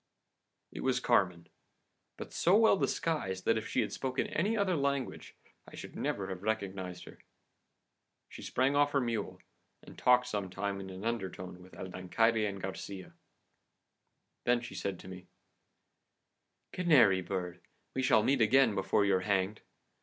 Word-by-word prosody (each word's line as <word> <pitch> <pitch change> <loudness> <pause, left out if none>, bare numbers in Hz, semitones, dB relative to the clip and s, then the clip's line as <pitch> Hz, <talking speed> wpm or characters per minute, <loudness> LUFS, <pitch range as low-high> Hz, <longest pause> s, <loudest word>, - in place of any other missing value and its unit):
"It - - -8
was 130 -1 +1
Carmen, 95 -9 +1 0.7
but - - -8
so 180 +4 +4
well 220 -2 +6
disguised 120 - -1
that 115 - +3
if 110 - -3
she - - +1
had - - -3
spoken 130 0 -2
any 205 +8 0
other 195 -3 +1
language 140 -2 -2 0.3
I - - -12
should - - -9
never 95 -1 -2
have 95 -1 -5
recognised 100 -4 -3
her. - - -13 1.1
She - - -11
sprang 130 +3 +1
off 145 0 +3
her 140 - +3
mule, 115 -5 -3 0.4
and - - -13
talked 125 0 +4
some 105 -6 -3
time 100 +1 -3
in 95 - -8
an 95 +3 -8
undertone 95 -5 -4
with 95 +1 -15
El 95 - -7
Dancaire 110 +5 +1
and 100 -1 -5
Garcia. 95 0 -7 1.3
Then 120 0 +2
she 120 - -8
said 100 -2 -3
to - - -12
me: 95 -1 -10 1.4
"'Canary 130 - +4
bird, 90 -1 -4 0.3
we 130 - -1
shall 110 -4 +4
meet 135 0 +2
again 115 +1 +5
before 95 +1 +1
you're 95 -2 +3
hanged. 95 +1 0
105 Hz, 155 wpm, -32 LUFS, 95-130 Hz, 1.4 s, well